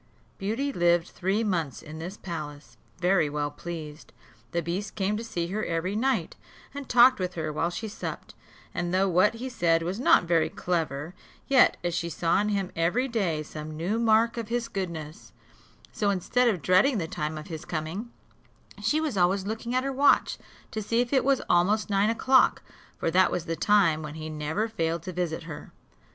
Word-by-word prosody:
Beauty 230 +8 -2
lived 175 -2 +2
three 195 +4 -1
months 170 - -2
in 155 +1 -9
this 180 +5 -6
palace, 150 -5 -7 0.2
very 175 -3 +3
well 145 0 -2
pleased. 155 -1 -8 0.4
The 170 0 -1
beast 185 +5 -4
came 200 0 0
to 220 - -4
see 175 -7 -3
her 215 +3 -2
every 170 +4 -2
night, 265 +4 0 0.4
and 285 -2 -7
talked 250 0 +6
with 180 -1 -3
her 155 -2 -3
while 165 +3 0
she 175 +6 -5
supped; 210 - -7 0.4
and 175 +1 -2
though 195 +1 +3
what 185 +5 +3
he 245 +3 -5
said 170 -9 +1
was 180 +5 -3
not 250 - +5
very 170 -2 +2
clever, 160 -2 -2 0.3
yet 265 -2 +5
as 175 -1 -1
she 170 0 -2
saw 170 +3 +1
in 210 - 0
him 200 -3 -1
every 180 +11 +1
day 190 -11 -1
some 155 0 -8
new 190 +8 -1
mark 230 +1 +3
of 230 -2 -3
his 235 0 -1
goodness, 170 -5 -6 0.6
so 205 - 0
instead 215 +6 +1
of 190 -10 0
dreading 200 +8 +4
the 165 -5 -2
time 155 0 -3
of 155 - -7
his 160 -1 -7
coming, 170 +9 -4 0.7
she 305 - +2
was 305 -9 -2
always 190 +2 +2
looking 225 +3 -3
at 255 - +2
her 275 0 -2
watch, 280 +2 +3 0.3
to 220 - -3
see 230 +3 0
if 245 +2 0
it 265 - +4
was 275 -1 +2
almost 205 +5 +2
nine 200 +2 +3
o'clock; 260 +3 +3 0.3
for 165 - -1
that 185 +2 +4
was 175 - -2
the 165 -1 -2
time 175 -6 +3
when 150 -1 -7
he 155 0 -6
never 155 +8 -2
failed 165 -6 -2
to 185 - -6
visit 170 -2 -2
her. 155 -2 -9
180 Hz, 195 wpm, -27 LUFS, 165-220 Hz, 0.7 s, talked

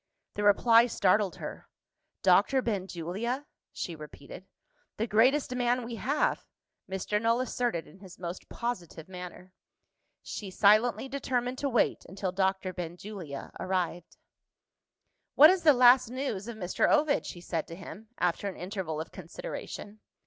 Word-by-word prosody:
The 205 - -3
reply 230 +3 +6
startled 200 -3 +2
her. - - -8 0.5
"Dr. 265 -2 +4
Benjulia?" 200 - -3 0.3
she 170 - -5
repeated. 150 +4 -11 0.5
"The 220 - 0
greatest 250 +5 +3
man 245 0 +1
we 230 0 -6
have!" 290 +6 0 0.5
Mr. 190 +2 -1
Null 230 +1 +2
asserted 245 -8 -1
in 190 - -17
his 190 -2 -13
most 175 0 -7
positive 180 -9 -5
manner. 180 0 -9 0.7
She 205 - -6
silently 215 +7 +4
determined 255 -2 -2
to 280 - 0
wait 240 -3 +1
until 190 0 -3
Doctor 190 0 0
Benjulia 175 -3 -7
arrived. 180 -2 -2 1.2
"What 305 +4 +9
is 375 -1 0
the 315 - +7
last 250 -1 +6
news 245 -6 -3
of 235 -2 -6
Mr. 180 -3 +1
Ovid?" 295 -1 +2
she 175 - -7
said 170 -2 -3
to 165 - -8
him, 195 +4 -10
after 180 +3 0
an 195 - -5
interval 180 -4 -4
of 160 - -6
consideration. 220 - -8
205 Hz, 140 wpm, -29 LUFS, 180-245 Hz, 1.2 s, What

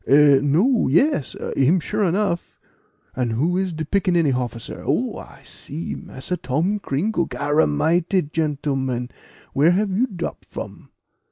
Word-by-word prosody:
"Eh! 140 0 +6
no 185 - +3
yes, 165 - +2 0.2
him 145 +7 +3
sure 210 +6 -1
enough; 185 -1 -1 0.6
and 125 -3 -1
who 155 +10 +1
is 190 0 0
de 160 -1 -4
picaniny 175 -4 +2
hofficer 120 -2 -4
Oh! - - 0
I - - -13
see, 155 +4 -7
Massa 180 +7 -5
Tom 165 +11 -1
Cringle? 175 +3 -1
Garamighty, 155 - +1
gentlemen, 135 -5 -1 0.4
where 155 +6 +4
have 200 +2 +1
you 225 +8 +1
drop 180 -7 -5
from? - - -9
160 Hz, 135 wpm, -22 LUFS, 135-185 Hz, 0.6 s, Eh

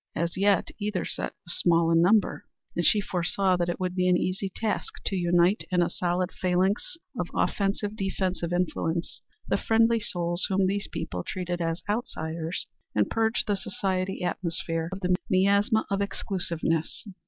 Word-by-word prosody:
As 170 +1 -1
yet 200 0 +3
either 205 -5 -1
set - - -4
was 175 - -3
small 170 -1 +4
in 165 0 +5
number, 200 +4 +3 0.3
and 175 - +1
she 210 +4 +4
foresaw 185 0 +1
that 175 -1 0
it 175 - -2
would 185 -1 -1
be 180 0 +2
an 180 - +5
easy 190 +2 -1
task 215 +3 -2
to 195 - 0
unite 175 +2 +3
in 180 -1 +3
a - - -1
solid 180 +1 -1
phalanx 185 - 0 0.2
of - - -1
offensive 205 +1 0
defensive 190 -3 -2
influence 175 -1 -1 0.3
the - - +2
friendly 230 +1 +3
souls 175 -4 0
whom 190 0 +3
these 200 +2 0
people 90 -1 -4
treated 175 -1 -3
as 165 0 -1
outsiders, 165 -6 -2 0.3
and 105 -1 +2
purge 225 0 +1
the 210 - +1
society 190 -1 -2
atmosphere 165 -2 -2
of 190 +1 -5
the 180 -1 +3
miasma 200 +4 +3
of 200 0 +1
exclusiveness. 170 -6 -2
185 Hz, 165 wpm, -27 LUFS, 175-200 Hz, 0.3 s, in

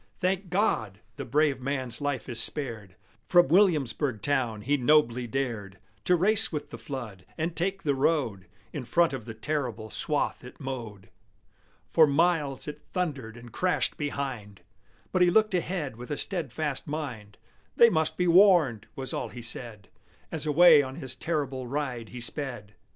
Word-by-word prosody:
Thank 185 0 0
God! 110 - 0 0.2
the - - -5
brave 145 0 +1
man's 130 -1 -3
life 140 -5 -2
is 115 -2 -2
spared! 110 -11 -4 0.3
From 175 -5 +6
Williamsburg 150 - +2
town 125 -7 0
he 145 +4 +2
nobly 125 -3 +3
dared 110 -6 -3 0.3
To 180 - +5
race 215 +5 +2
with 150 -2 -5
the - - -8
flood, 115 -9 -7
and 165 +1 -2
take 195 +3 -1
the 145 - +2
road 130 - 0 0.3
In 145 - -4
front 170 +5 +2
of 125 -5 -5
the 115 -2 -7
terrible 120 -4 -3
swath - - -1
it - - -12
mowed. 115 -7 -7 0.8
For 160 -2 +5
miles 150 -2 +1
it 150 - -6
thundered 140 - -3
and 120 0 -12
crashed 180 0 0
behind, 135 - -4 0.5
But 185 - +1
he 180 - +6
looked 215 +2 +3
ahead 170 -8 -2
with 125 +1 -9
a 145 - -2
steadfast 155 -5 -2
mind: 125 -9 -5 0.4
"They 235 -1 +7
must 160 -3 0
be 180 - +1
warned!" 170 - +5
was 135 -3 -2
all - - -3
he 120 - -9
said, 115 -3 -4 0.4
As 155 -1 -4
away 155 0 +7
on 130 -1 -6
his 135 -5 -7
terrible 135 -5 -3
ride 125 -4 -3
he 125 - -8
sped. 120 -5 -4
140 Hz, 160 wpm, -28 LUFS, 120-165 Hz, 0.8 s, They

